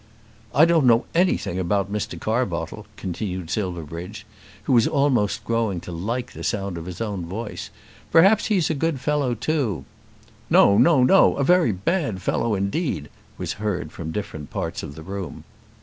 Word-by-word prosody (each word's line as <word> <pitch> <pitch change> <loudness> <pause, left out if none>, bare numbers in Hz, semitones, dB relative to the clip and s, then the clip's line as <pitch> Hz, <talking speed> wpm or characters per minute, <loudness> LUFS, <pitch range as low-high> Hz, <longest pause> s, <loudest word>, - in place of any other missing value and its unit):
"I 150 - +7
don't 165 -5 +3
know 115 +1 +5
anything 170 - +1
about 100 +2 0
Mr. 105 - -3
Carbottle," - - -2
continued 90 -2 -4
Silverbridge, 90 0 -4 0.4
who - - 0
was 115 -2 +5
almost 140 -8 +1
growing 115 -5 0
to - - -8
like 110 +9 -3
the - - -9
sound 100 -2 -2
of 80 - -9
his 90 +4 -7
own 100 -6 -3
voice. 105 +5 -6 0.4
"Perhaps 195 +6 +5
he's 185 -8 +2
a - - +1
good 155 -1 -1
fellow 140 -2 0
too." 125 - -1 0.6
"No; 100 - +6
no, 155 -7 +5
no. 190 +10 +5
A 140 - +1
very 175 -4 +4
bad 110 - -1
fellow 115 +3 0
indeed," 100 - -2 0.3
was - - -3
heard 90 -7 -2
from 80 -1 -6
different 80 -6 -5
parts - - -4
of 70 - -8
the 80 - -9
room. 95 -4 -6
105 Hz, 165 wpm, -23 LUFS, 90-140 Hz, 0.6 s, I